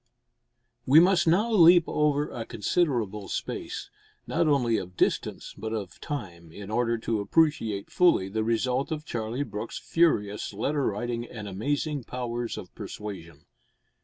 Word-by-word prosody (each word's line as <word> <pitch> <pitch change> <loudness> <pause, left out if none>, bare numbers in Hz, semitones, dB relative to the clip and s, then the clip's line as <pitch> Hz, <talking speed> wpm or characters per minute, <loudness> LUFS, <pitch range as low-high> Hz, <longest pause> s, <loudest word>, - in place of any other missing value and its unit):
We 140 +5 +8
must 180 0 +4
now 205 +8 +3
leap 175 -4 +7
over 150 -1 +1
a 115 - -4
considerable 110 - -1
space, - - -5 0.3
not 165 0 +1
only 125 -6 +2
of 90 0 -7
distance, - - -1
but 110 +2 -5
of 100 -5 -5
time, 85 - -6
in 100 +4 -9
order 115 +1 +1
to 115 -1 -1
appreciate 110 -3 +1
fully 175 - +4
the 110 +3 -2
result 125 +5 0
of 155 -1 -3
Charlie 115 +3 -3
Brooke's 110 -4 -6
furious 105 -13 +1
letter 140 +7 0
writing 120 +3 -2
and 110 -4 -8
amazing 140 +7 -2
powers 120 -1 -4
of - - -9
persuasion. 85 -8 -8
120 Hz, 140 wpm, -27 LUFS, 105-150 Hz, 0.3 s, We